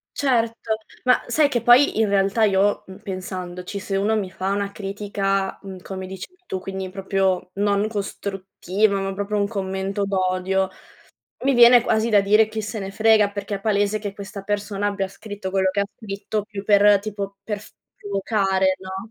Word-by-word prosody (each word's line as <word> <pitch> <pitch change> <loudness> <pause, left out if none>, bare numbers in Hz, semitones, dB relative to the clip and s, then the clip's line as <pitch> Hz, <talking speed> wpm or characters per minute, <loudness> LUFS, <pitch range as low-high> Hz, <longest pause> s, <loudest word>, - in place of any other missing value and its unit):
Certo, 230 -4 0 0.3
ma 250 - +4
sai 290 +5 +3
che 240 -5 -1
poi 240 +2 +5
in 215 -2 +3
realtà 200 +2 +2
io, 200 0 +2
mhmm, 190 0 -11
pensandoci, 185 0 -6
se 195 0 -4
uno 210 +3 +1
mi 195 -3 -2
fa 190 +1 -3
una 200 0 -1
critica, 195 -1 -2
mhmm, 190 -1 -8
come 190 0 -6
dici 190 0 -7 0.2
tu, 190 - -4
quindi 190 0 -5
proprio 190 -1 -1
non 205 +1 +1
costruttiva, 200 -1 -2
ma 195 0 -2
proprio 205 +1 -2
un 200 - +1
commento 195 -1 -3
d'odio, 190 0 0 0.8
mi 275 - +4
viene 240 0 +8
quasi 220 -1 +1
da 205 -3 +5
dire: 210 +2 +4
"Chi 220 0 -4
se 215 +1 -5
ne 195 -1 -5
frega." 215 0 +4
Perché 200 0 -4
è - - -10
palese 205 0 +1
che 205 -1 -5
questa 200 0 -8
persona 205 0 -2
abbia 195 -1 -1
scritto 205 -1 -7
quello 190 0 +2
che 200 +1 -1
ha 200 - 0
scritto 205 0 -4
più 205 -1 -7
per 205 0 +6
tipo 200 -1 -5
per 210 -1 -3
f - - -15 0.3
provocare, 195 -2 +1
no? 190 +3 -7
200 Hz, 180 wpm, -22 LUFS, 195-210 Hz, 0.8 s, viene